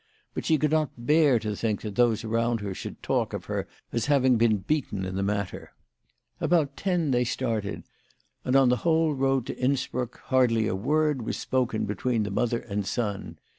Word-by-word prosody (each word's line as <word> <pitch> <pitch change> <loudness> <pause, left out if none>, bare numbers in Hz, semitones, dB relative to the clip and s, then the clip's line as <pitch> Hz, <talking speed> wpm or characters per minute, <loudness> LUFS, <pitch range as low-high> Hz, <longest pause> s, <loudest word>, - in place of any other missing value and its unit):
But - - -4
she 160 - +3
could 150 0 +1
not 155 -3 +2 0.2
bear 150 -3 +5
to 105 -2 -3
think 105 -1 -1
that 105 -2 -5
those 115 0 +2
around 115 0 0
her 100 -2 -3
should - - -8
talk - - 0
of - - -5
her - - -3 0.3
as 115 +1 0
having 130 -3 +4
been 115 -2 +3
beaten 100 -3 -2
in 95 - -4
the 95 - -1
matter. 100 -1 -3 0.7
About 150 -5 +1
ten 175 -6 0
they 125 -1 +3
started, 115 -4 -2 0.6
and 125 - 0
on 135 -2 +6
the 125 - +3
whole 160 +4 +2
road 135 -2 +1
to - - -5
Innsbruck 125 -2 -1
hardly 120 -4 +2
a 95 - -1
word 150 +6 +1
was 110 - -3
spoken 125 -4 0
between 110 +2 -1
the 105 - -3
mother 120 +3 0
and 105 -2 -3
son. 105 -3 -3
120 Hz, 190 wpm, -27 LUFS, 110-140 Hz, 0.7 s, on